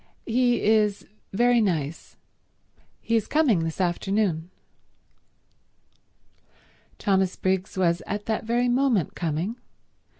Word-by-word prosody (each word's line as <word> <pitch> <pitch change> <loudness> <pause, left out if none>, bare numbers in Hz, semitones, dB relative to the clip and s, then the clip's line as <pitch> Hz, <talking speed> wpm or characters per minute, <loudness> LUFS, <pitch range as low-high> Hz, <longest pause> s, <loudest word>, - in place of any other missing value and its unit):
He 245 +1 +1
is 210 -2 +2 0.3
very 240 +3 +3
nice. 160 -6 -2 0.8
He 230 - 0
is 220 -2 +1
coming 290 - +3
this 165 +1 -3
afternoon." 180 -1 0 2.5
Thomas 190 -2 +1
Briggs 190 +1 -1
was 170 -2 +2
at 205 +1 -4
that 220 -1 -1
very 240 +2 +1
moment 245 - +1
coming. 170 +7 -3
205 Hz, 100 wpm, -25 LUFS, 175-230 Hz, 2.5 s, very